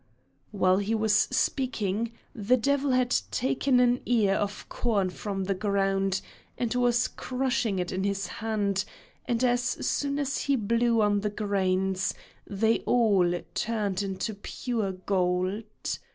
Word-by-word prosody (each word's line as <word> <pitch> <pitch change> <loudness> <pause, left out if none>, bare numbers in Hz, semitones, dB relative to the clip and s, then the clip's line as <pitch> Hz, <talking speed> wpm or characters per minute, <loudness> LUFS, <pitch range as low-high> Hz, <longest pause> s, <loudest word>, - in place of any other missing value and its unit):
While 185 -2 +2
he 205 +3 0
was 220 -1 +2
speaking, 230 -2 0 0.2
the 235 +3 +2
devil 280 +3 +1
had 255 -1 +2
taken 260 +1 +1
an 245 0 +3
ear 220 -5 +3
of 205 +1 -3
corn 200 -6 0
from 195 +1 -4
the 195 +1 0
ground 195 -1 0 0.4
and 240 -2 -1
was 245 -1 +2
crushing 250 -5 -1
it 180 -1 -2
in 190 +1 -2
his 200 -1 -1
hand, 205 -1 -1 0.4
and 240 0 0
as 245 -1 +3
soon 280 +3 -1
as 280 -1 -1
he 280 - +1
blew 230 0 +2
on 205 -1 +2
the 210 +1 -1
grains 190 -2 0 0.3
they 220 +3 +1
all 195 -7 +3
turned 210 -4 -1
into 195 +2 -3
pure 210 0 -3
gold. 185 +1 0
210 Hz, 140 wpm, -27 LUFS, 195-245 Hz, 0.4 s, an